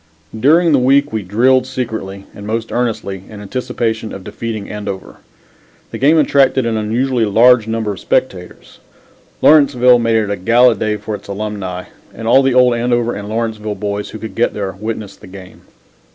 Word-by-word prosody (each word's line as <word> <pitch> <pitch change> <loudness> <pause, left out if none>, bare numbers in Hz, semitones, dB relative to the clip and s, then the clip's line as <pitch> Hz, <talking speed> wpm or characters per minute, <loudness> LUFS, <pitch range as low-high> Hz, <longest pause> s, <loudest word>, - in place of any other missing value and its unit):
During 160 +7 +4
the 140 - +4
week 135 +1 +2
we 110 - -1
drilled 125 +7 +2
secretly 110 -7 -5
and 100 0 -10
most 115 +1 -3
earnestly 110 -6 -2
in 105 - -10
anticipation 110 0 -3
of 95 - -8
defeating 110 +1 -6
Andover. 100 -2 -7 0.7
The - - -6
game 150 +5 +4
attracted 135 -4 +3
an 115 -1 -1
unusually 115 +3 0
large 115 +2 +4
number 110 -2 -2
of 100 - -7
spectators. - - -3 0.6
Lawrenceville 125 -5 +5
made 115 -1 +1
it 105 -2 0
a 100 - -2
gala 120 +6 +4
day 110 -1 -2
for 105 +1 -6
its 100 -1 -8
alumni, 100 -3 -5 0.3
and 115 - -6
all 130 +3 +5
the 135 -2 +1
old 125 -1 +5
Andover 120 0 0
and 100 0 -7
Lawrenceville 110 -2 -3
boys 105 0 -4
who - - -8
could 110 0 -8
get 120 - 0
there 100 -2 -3
witnessed 105 0 -7
the - - -12
game. 95 -1 -13
110 Hz, 175 wpm, -16 LUFS, 105-125 Hz, 0.7 s, Lawrenceville